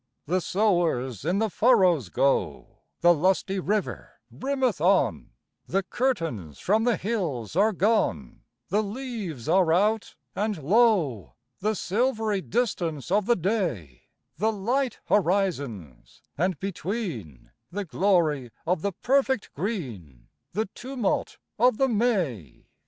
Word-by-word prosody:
The 180 +4 0
sowers 170 - 0
in 180 +4 +1
the 220 -1 0
furrows 185 - +3
go; 135 +8 0 0.2
The 175 0 +7
lusty 190 +4 +1
river 205 +2 -2 0.2
brimmeth 260 - -1
on; 175 - +2 0.4
The 195 +2 0
curtains 165 - -2
from 215 +4 +1
the 240 -2 +2
hills 165 - -3
are 210 +4 +4
gone; 180 - 0 0.3
The 205 +4 +2
leaves 210 - -5
are 185 -4 +4
out; 210 +5 +1 0.2
and 210 +1 -1
lo, 180 - +2 0.2
The 215 +2 0
silvery 220 0 0
distance 175 - -2
of 205 +1 +2
the 240 - +4
day, 165 - -2 0.3
The 215 +6 +2
light 240 +6 -1
horizons, 145 - -1
and 180 0 0
between 175 - -5 0.2
The 200 +2 -3
glory 165 -8 +1 0.2
of 175 0 0
the 200 +1 -1
perfect 265 -3 +1
green, 120 - -5 0.2
The 215 +4 0
tumult 245 +1 -3 0.2
of 245 -1 +4
the 270 - +3
May. 195 - -1
190 Hz, 120 wpm, -26 LUFS, 155-220 Hz, 0.4 s, The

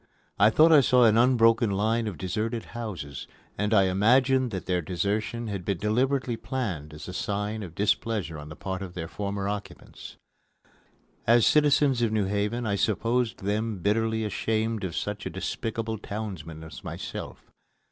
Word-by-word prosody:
I 105 +2 +7
thought 155 +9 +5
I 150 -3 +8
saw 125 -1 +4
an 110 -2 +5
unbroken 115 -2 +4
line 110 +3 0
of 100 -6 -5
deserted 110 +7 -2
houses, 95 -12 -6 0.3
and 105 +2 -1
I 105 -3 +5
imagined 125 +7 +3
that 95 -4 -5
their 90 -1 0
desertion 100 +7 -2
had 100 -4 -4
been 100 0 -1
deliberately 120 +5 0
planned 95 - -4
as 75 - -9
a 90 - -6
sign 105 +3 -2
of 85 -5 -8
displeasure 105 -4 -1
on 75 0 -9
the 75 - -8
part 95 0 -5
of 90 -2 -7
their 80 -2 -4
former 100 +1 -3
occupants. 105 0 -7 1.1
As 115 -1 +6
citizens 145 -4 +4
of 115 -2 +2
New 105 -2 +1
Haven, 105 +4 -1
I 100 -2 0
supposed 115 +2 0
them 105 +1 -1
bitterly 110 +3 0
ashamed 110 +1 -1
of 90 -4 -3
such - - -3
a - - -3
despicable 110 -1 -3
townsman 95 -8 -6
as 80 -5 -10
myself. - - -7
105 Hz, 165 wpm, -27 LUFS, 95-115 Hz, 1.1 s, I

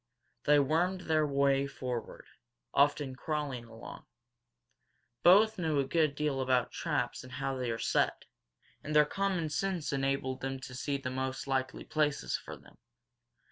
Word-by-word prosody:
They 150 0 +6
wormed 170 +6 +2
their 155 -3 +2
way 140 0 +2
forward, 125 -3 -5 0.5
often 145 -1 +2
crawling 145 -4 -3
along. 115 0 -11 1.1
Both 205 +4 +6
knew 160 -4 0
a 135 - +1
good 155 -1 +1
deal 145 -3 0
about 130 -2 +1
traps - - -2
and 130 0 -11
how 135 0 -2
they 125 -2 -2
are 115 - -1
set, - - 0 0.6
and 150 +1 -4
their 150 0 +7
common 185 -1 -1
sense 180 -3 -1
enabled 135 -1 -1
them 135 0 -3
to 130 -1 -8
see 140 +2 -2
the 130 -2 -5
most 130 0 -3
likely 130 -1 -1
places 150 -2 0
for - - -7
them. - - -20
140 Hz, 150 wpm, -31 LUFS, 130-155 Hz, 1.1 s, their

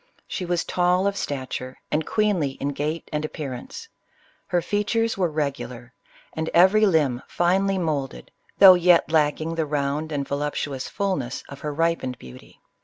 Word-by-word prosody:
She 180 - -4
was 175 0 0
tall 180 +1 +1
of 200 0 +1
stature, 130 -5 -4
and 155 +1 0
queenly 195 -10 +1
in 140 +1 -3
gait 150 +3 -3
and 150 0 -1
ap 155 - -5
pearance. 145 - -7 0.6
Her 175 - +1
features 210 +5 0
were 180 -3 +1
regular, 135 -5 -4 0.4
and 160 0 -3
every 195 +5 +6
limb 145 -9 +2
finely 190 +3 +1
moulded, 145 - -3 0.3
though 195 -2 +10
yet 175 -2 +4
lacking 155 +1 +1
the 165 -1 -1
round 145 +2 -2
and 140 -2 -2
vo 140 - -2
CLEOPATRA. 145 0 -1
15 145 - -2
luptuous 130 -1 -5
fullness 145 - -2
of 140 - -9
her 150 - -4
ripened 165 -5 -1
beauty. 65 - -14
155 Hz, 170 wpm, -24 LUFS, 140-180 Hz, 0.6 s, though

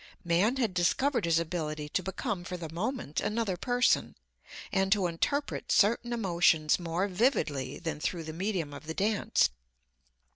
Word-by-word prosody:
Man 180 +8 +2
had 235 -8 0
discovered 235 +7 +1
his 165 -1 +3
ability 155 -3 -2
to 185 - 0
become 190 +1 -3
for 180 0 -5
the 160 -2 -7
moment 195 - -2
another 215 -3 -1
person, 245 +6 +1 0.6
and 195 0 +1
to 200 -2 +3
interpret 280 - -1
certain 235 +3 +3
emotions 170 -8 +3
more 175 +3 -1
vividly 180 - 0
than 160 -3 -4
through 165 +2 -2
the 155 0 -6
medium 175 -4 -2
of 155 - -10
the 160 - -4
dance. 205 +1 +2
180 Hz, 150 wpm, -30 LUFS, 165-220 Hz, 0.6 s, his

